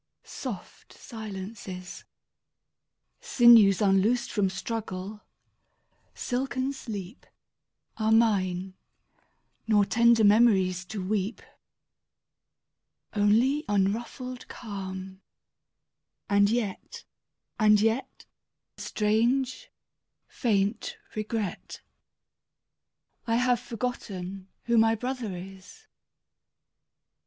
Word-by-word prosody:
Soft - - -8
silences, 195 -4 -8 1.1
Sinews 225 -5 +6
unloosed 205 +5 +2
from 200 -3 +1
struggle, 205 -1 -5 0.9
silken 260 +1 -2
sleep, 210 -5 -8 0.7
27 220 - -4
Are - - +3
mine; 190 -5 +2 0.9
nor 210 -2 +4
tender 235 +1 +4
memories 200 -4 +4
to 195 -1 -5
weep. 210 +2 -2 1.7
Only 230 +8 +3
unruffled 235 +6 -2
calm; 190 -3 -7 1.1
and 200 0 +4
yet 220 -4 -3 0.3
— - - -50
and 210 -1 +5
yet 225 +5 -1 0.3
— - - -58
Strange, 245 - 0 0.6
faint 210 -2 -1 0.2
regret 215 -3 -4 0.7
— - - -47
I 230 - +2
have 245 0 +2
forgotten 205 -6 -5 0.2
who 235 -1 +3
my 225 0 +4
brother 245 -5 -4
is! 190 - -12
215 Hz, 80 wpm, -27 LUFS, 195-235 Hz, 1.7 s, Sinews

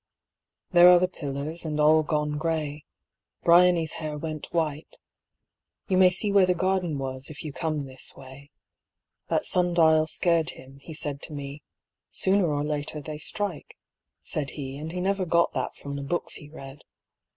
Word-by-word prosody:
There 175 0 +8
are 180 - +8
the 180 +1 +2
pillars, 150 -1 -5
and 155 -2 -3
all 155 +1 +5
gone 150 -1 -1
gray. 155 -3 -2 0.6
Briony's 170 -1 +5
hair 155 -1 -4
went 155 0 -6
white. 155 -2 -2 0.9
You 185 - +2
may 185 -1 +7
see 195 +3 0
Where 195 -2 +5
the 180 - +2
garden 185 -3 0
was 130 -1 -5
if 155 - -9
you 150 -3 -6
come 155 -3 -2
this 130 -1 -5
way. 135 +2 -13 0.8
That - - 0
sun 180 -1 +1
dial 160 -2 +5
scared 165 0 +1
him, 135 +1 -14
he 155 +3 -10
said 140 -2 -1
to 155 - -6
me; 140 0 -7 0.5
"Sooner 190 -4 +2
or 145 0 -1
later 150 0 -3
they 150 +1 -7
strike," 195 0 -3 0.5
said 145 -3 -2
he, 135 -2 -5
And 155 +2 -6
he 180 - -4
never 195 +1 0
got 170 -1 +2
that - - -3
from 140 0 -7
the 140 - -4
books 170 +5 -2
he 150 -3 -6
read. 135 -2 -11
155 Hz, 175 wpm, -26 LUFS, 145-175 Hz, 0.9 s, There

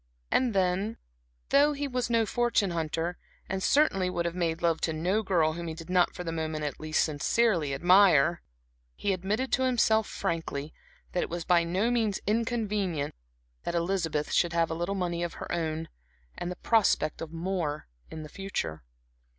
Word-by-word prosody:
And 245 -5 +2
then 190 +4 +1 0.5
though 290 +2 +5
he 285 0 -3
was 250 -2 -2
no 230 -1 +3
fortune 235 -3 +1
hunter, 165 +1 -2 0.3
and 190 0 -3
certainly 195 -9 +3
would 170 -1 -2
have 170 - -1
made 170 -1 -1
love 165 -1 +2
to 160 - 0
no 180 +7 +1
girl 170 -6 +2
whom 170 +1 -5
he 160 - -4
did 165 +2 -9
not 180 -1 +3
for 180 - -5
the 165 - -3
moment 160 -1 -3
at 145 -3 -4
least 155 0 +1
sincerely 160 +2 +1
admire, 175 0 +5 0.5
he 200 - 0
admitted 205 +8 -2
to 260 - +2
himself, 225 -4 +3
frankly, 160 -5 -3 0.4
that 180 - 0
it - - -2
was 170 0 -4
by 175 -2 +4
no 190 +8 0
means 220 -5 +1
inconvenient 210 -8 -1 0.5
that 170 - -3
Elizabeth 170 -3 -1
should 175 -1 +2
have 165 -1 +1
a - - 0
little 175 +4 -2
money 175 -2 -2
of 175 -1 -3
her - - -7
own 160 -1 -2 0.5
and 175 - -4
the 180 - -4
prospect 195 -8 +2
of 165 -1 -6
more 165 -3 -3 0.2
in 160 -1 -7
the - - -8
future. 170 - -4
175 Hz, 180 wpm, -28 LUFS, 165-205 Hz, 0.5 s, though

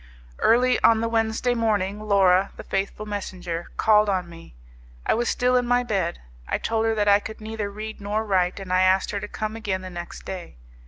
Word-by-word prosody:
Early 250 +2 +3
on 225 -1 +6
the 230 - 0
Wednesday 225 +2 +1
morning, 210 -4 0
Laura, 195 -2 +3
the - - -8
faithful 195 +2 -3
messenger, 185 -5 -5
called 210 -1 +4
on 185 -3 0
me; 165 - -13 0.5
I - - +3
was 240 +1 0
still 250 0 +2
in 245 -1 +2
my 245 0 +3
bed: 195 -7 -1 0.3
I - - 0
told 225 0 -1
her 225 - +1
that 210 -1 +1
I 200 0 +6
could 220 +1 -8
neither 215 -1 -4
read 215 +1 -7
nor 210 +2 -1
write, 185 -2 +1
and 190 -2 -4
I 185 - +4
asked 185 +1 +3
her 200 - -2
to 210 - -6
come 215 +1 -4
again 195 -4 -3
the 185 - -7
next 175 0 -8
day. 185 -3 -7
205 Hz, 210 wpm, -24 LUFS, 190-220 Hz, 0.5 s, on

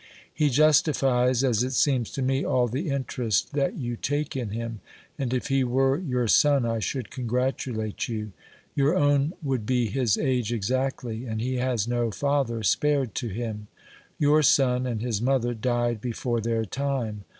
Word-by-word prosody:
He 150 -2 +2
justifies, 135 -3 +3
as 120 -4 +2
it 130 +1 -1
seems 130 -5 +2
to 135 - -2
me, 135 +1 +1
all 125 -1 +2
the 140 +8 -3
interest 130 -5 -1
that 140 -1 0
you 120 -2 -3
take 145 +4 -2
in 125 -5 -3
him; 115 +1 -5 0.4
and 130 -3 -1
if 130 +3 -2
he 135 -1 +2
were 135 +3 +2
your 125 -9 -1
son, 140 +3 +4
I 115 -1 -1
should 125 0 -3
congratulate 125 -3 -2
you. 110 -2 -4 0.4
Your 140 +5 +2
own 145 -1 +2
would 130 -5 -1
be 125 -2 +2
his 120 -4 +1
age 125 -5 0
exactly, 125 +1 -2
and 110 -1 -3
he 130 +3 -1
has 125 -4 0
no 120 -1 0
father 135 -2 -1
spared 140 0 +1
to 120 - -3
him! 110 0 -5 0.5
Your 150 +1 +4
son 130 -3 +3
and 115 -3 -3
his 115 -4 -1
mother 120 -1 +1
died 120 -1 -1
before 120 0 -2
their 115 0 -1
time. 125 -4 -3
125 Hz, 170 wpm, -26 LUFS, 115-135 Hz, 0.5 s, son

